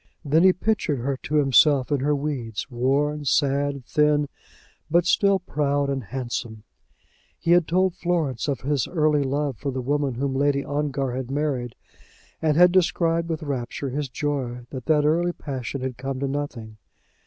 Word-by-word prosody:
Then 150 +3 +3
he 185 +1 +7
pictured 185 -6 0
her 135 +3 -2
to 150 - -4
himself 140 -1 +4
in 145 - +2
her 145 +3 +1
weeds, 140 -5 -4
worn, 140 +5 0
sad, 140 -1 +1
thin, 150 0 +2 0.6
but 175 +1 +3
still 195 +1 +3
proud 145 -5 -1
and 135 -4 -3
handsome. 120 -3 -5 0.7
He 170 - -1
had 175 -2 +5
told 185 +2 +2
Florence 170 -9 -1
of 140 -2 -2
his 140 -3 0
early 155 -3 +2
love 140 -1 -1
for 140 - -3
the 130 - -4
woman 140 0 -1
whom 135 +2 -1
Lord 140 +1 +2
Ongar 140 -2 -1
had 130 0 -4
married, 135 -4 -2 0.7
and 155 -2 +2
had 180 0 +7
described 170 -2 +1
with 160 -1 -3
rapture 135 -1 -4
his 145 0 -3
joy 130 -4 -3
that 130 -3 -7
that 150 -2 +3
early 170 +3 +2
passion 135 -3 -5
had 130 -2 -4
come 135 0 -4
to 140 - 0
nothing. 130 -6 -5
145 Hz, 165 wpm, -24 LUFS, 130-150 Hz, 0.7 s, he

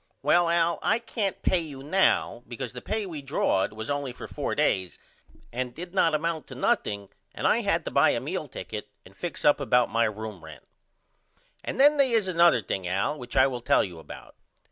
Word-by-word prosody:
Well 175 -1 +4
Al 170 0 +2
I 220 - +2
can't 225 -4 -3
pay 185 - +3
you 145 -5 -8
now 155 -6 +2
because 125 0 -6
the 125 - -7
pay 215 -1 -2
we 160 -6 -6
drawed 135 -9 0
was 110 +4 -5
only 140 -2 -2
for - - -9
4 - - -3
days 95 -2 0 0.6
and 125 0 -3
did 175 +2 -8
not 165 -5 +3
amount 160 0 -2
to 130 - -9
nothing 100 -5 -1 0.3
and - - -4
I - - +4
had - - 0
to - - -4
buy - - +5
a - - +1
meal - - -4
ticket 105 -1 -7 0.2
and 95 - -16
fix 175 - -5
up 145 - +5
about 125 -3 +2
my 115 +1 +3
room 110 -4 -5
rent. 80 -1 -12 1.0
And - - -5
then 295 +2 +6
they 265 -4 +3
is 220 -4 +2
another 170 - +4
thing 95 -1 -3
Al 95 +11 -1
which 125 0 -6
I 130 - +7
will 125 -3 -2
tell - - +3
you 90 -4 -7
about. - - -11
135 Hz, 210 wpm, -27 LUFS, 110-175 Hz, 1.0 s, I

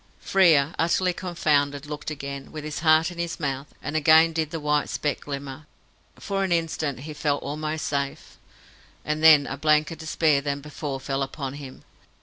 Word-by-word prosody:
Frere, 165 -6 +4
utterly 180 +2 +2
confounded, 150 -6 0
looked 150 0 -6
again, 140 -2 -7
with 155 -1 -7
his 150 0 -5
heart 155 +1 +4
in 170 - -10
his 170 0 -3
mouth, 140 -2 -3 0.2
and 150 - -4
again 160 +2 +5
did 160 -2 -1
the 165 - -4
white 150 -1 0
speck 150 - -2
glimmer. 140 +1 -7 0.5
For 195 -1 -2
an 190 - -2
instant 160 -5 -1
he 155 +2 -7
felt 150 -1 -1
almost 155 +2 -3
safe, 140 -1 -4 0.7
and 155 +1 -2
then 155 -3 +8
a 135 - -5
blanker 155 +2 +2
despair 155 -2 +1
than 140 0 -2
before 145 -1 -6
fell 135 +1 -3
upon 135 0 -4
him. 140 -2 -10
150 Hz, 170 wpm, -25 LUFS, 140-160 Hz, 0.7 s, then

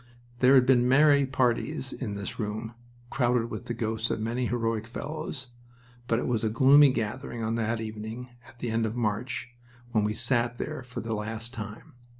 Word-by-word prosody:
There 130 +2 +6
had 130 -1 +6
been 125 -2 +4
merry 140 0 +5
parties 130 0 0
in 105 -6 -4
this 100 -1 -6
room, 110 +1 -3 0.4
crowded 120 -2 +1
with - - -5
the 120 - -2
ghosts 110 0 -1
of - - -1
many 120 +3 -1
heroic 115 -2 -1
fellows, 140 +1 -5 0.6
but 115 - +2
it - - -1
was 115 -3 0
a 110 - +2
gloomy 135 +5 +7
gathering 115 0 -3
on 110 +1 0
that 115 0 0
evening 110 +3 -6 0.2
at 125 - -16
the 120 -1 -3
end 115 0 +1
of 110 - -5
March 120 +2 -2 0.4
when 110 -3 +2
we 105 +1 0
sat 120 0 0
there 155 +2 -4
for 125 -1 -7
the 115 0 -3
last 110 +3 -4
time. 110 -2 -8
115 Hz, 185 wpm, -28 LUFS, 110-125 Hz, 0.6 s, gloomy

